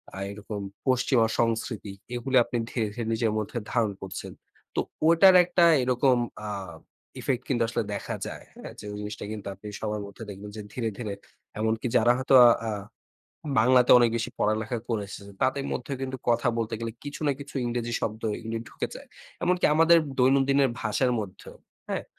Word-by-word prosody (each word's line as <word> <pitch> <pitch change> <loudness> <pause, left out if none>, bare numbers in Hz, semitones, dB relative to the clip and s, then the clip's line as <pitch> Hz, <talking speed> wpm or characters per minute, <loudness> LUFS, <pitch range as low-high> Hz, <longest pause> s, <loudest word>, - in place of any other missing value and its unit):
আ - - -7
এরকম 105 0 -6 0.3
পশ্চিমা 125 -2 +3
সংস্কৃতি 115 -2 -1 0.2
এগুলো 130 +2 -2
আপনি 120 - -3
ধীরে 110 -4 0
ধীরে 120 -1 -4
নিজের 110 -1 +1
মধ্যে 110 +3 -3
ধারণ 115 -4 +1
করছেন। 95 0 -6 0.4
তো - - +1 0.3
ওটার 185 +3 +7
একটা 175 -1 +3 0.2
এরকম 125 0 +3 0.3
আ - - -3 0.7
ইফেক্ট 130 -2 -1
কিন্তু 120 -3 +2
আসলে 115 - -1
দেখা 100 - -4
যায়। - - -8
হ্যাঁ? - - -9
ওই - - -24
যে - - -10 0.2
জিনিসটা 105 0 -6
কিন্তু 105 -2 -6
আপনি 105 +3 -11
সবার 105 -1 -3
মধ্যে 100 +3 -10
দেখবেন 100 +1 -8
যে - - -5
ধীরে 115 -3 -1
ধীরে 105 -4 -4 0.5
এমনকি 110 +2 0
যারা 120 +1 +5
হয়তো 130 +1 +3 0.3
আ - - 0 0.9
বাংলাতে 125 +1 +5
অনেক 120 -1 +4
বেশি 115 +2 -2
পড়ালেখা 110 +3 0
করেছে। 105 -2 -3 0.2
তাদের 135 +1 +1
মধ্যে 125 +2 -4
কিন্তু 130 0 -3
কথা 120 +1 +3
বলতে 115 0 -2
গেলে 115 -1 -3
কিছু 145 +1 -6
না 140 - +3
কিছু 140 - -10
ইংরেজি 120 -1 -2
শব্দ 110 +1 -3 0.2
এগুলি 115 0 -4
ঢুকে - - -4
যায়। - - -11 0.3
এমনকি 180 0 +1
আমাদের 165 +1 +6 0.2
দৈনন্দিনের 135 +1 +4
ভাষার 125 +4 +1
মধ্যেও 100 -2 -9 0.3
হ্যাঁ? - - -2
120 Hz, 170 wpm, -27 LUFS, 110-130 Hz, 0.9 s, ওটার